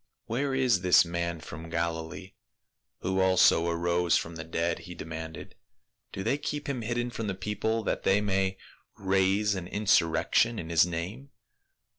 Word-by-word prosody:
"Where 135 +4 -1
is 125 -8 +2
this 90 -1 +6
man 85 -1 -3
from 80 +2 -9
Galilee 85 +2 -3 0.3
— - - -57
who 95 +1 0
also 95 -3 +4
arose 85 +1 +2
from 85 0 -4
the 80 - -6
dead 85 +1 -1
?" - - -13
he 90 - -7
demanded. 80 0 -7 0.3
" - - -55
Do 95 - -5
they 125 +7 0
keep 145 0 -4
him 135 -4 -2
hidden 120 +2 -2
from 115 -2 -4
the 95 - -2
people 105 +3 -2
that - - -1
they 95 +1 +3
may 95 -2 0 0.4
raise 95 +2 +2
an 95 -3 -5
insur 95 -4 +3
rection 115 +7 +2
in 80 - -6
his 85 +1 +5
name 90 +11 -5
95 Hz, 175 wpm, -28 LUFS, 85-110 Hz, 0.4 s, this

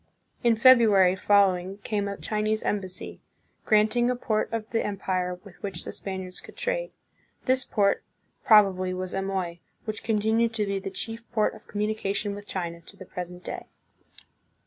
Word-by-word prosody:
In 235 -1 +5
Febru 235 -2 +7
ary 185 -1 +5
following 190 -1 +3
came 205 -2 -1
a 200 0 -4
Chinese 215 0 -1
embassy, 190 -3 -3 0.5
granting 220 +3 +4
a 250 - +1
port 220 -3 -1
of 225 -1 -3
the 225 - +1
empire 185 -3 -2
with 200 -4 -15
which 200 -1 -4
the - - -5
Spaniards 190 -2 -5
could - - -14
trade. - - -1 0.6
This 260 +1 +3
port, 205 -6 +1 0.4
probably, 190 -4 +5
was 185 0 -4
Amoy, 190 -3 -2 0.3
which 215 -2 -4
continued 225 +1 +1
to 210 -2 +1
be 200 -1 -1
the 195 0 -5
chief 225 +4 -5
port 215 -3 +2
of - - -15
communication 205 -1 -1
with 205 0 -9
China 170 -2 -4
to - - -13
the 185 - -10
present 180 0 -7
day. - - -5
205 Hz, 165 wpm, -27 LUFS, 185-220 Hz, 0.6 s, Febru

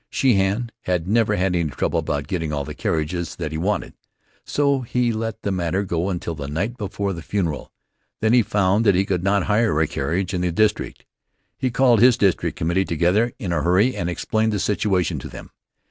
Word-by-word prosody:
Sheehan 115 -1 +1
had 90 -2 -1
never 110 0 +2
had 90 -1 0
any 85 -3 0
trouble 65 - -1
about 70 -1 -2
getting 80 -5 -2
all 70 -2 -2
the - - -6
carriages 80 +2 -2
that 80 -3 -4
he 80 - -3
wanted, 100 +5 -1 0.5
so 140 -2 +1
he 120 -1 0
let 110 0 -4
the 100 - -1
matter 90 +1 -1
go 90 -1 -1
until 85 -2 -3
the 70 -3 -6
night 95 +11 -2
before 100 -3 -3
the 85 - -7
funeral. 85 -4 -3 0.5
Then 110 +1 +2
he 125 - +6
found 100 0 +1
that 100 - +5
he 95 +2 +2
could 90 -3 -1
not 100 0 +2
hire 105 -7 +2
a 80 - +3
carriage 85 +7 -2
in 90 - -1
the 90 -1 0
district. 105 +4 0 0.5
He 130 - -1
called 120 -2 +4
his 125 -1 +6
district 95 -3 +1
committee 85 +4 +1
together 90 +7 +1
in 100 -10 -3
a 80 - 0
hurry 95 - +3
and 85 - -2
explained 110 +5 0
the 105 - -1
situation 100 -3 0
to - - -8
them. - - -11
95 Hz, 205 wpm, -22 LUFS, 85-110 Hz, 0.5 s, he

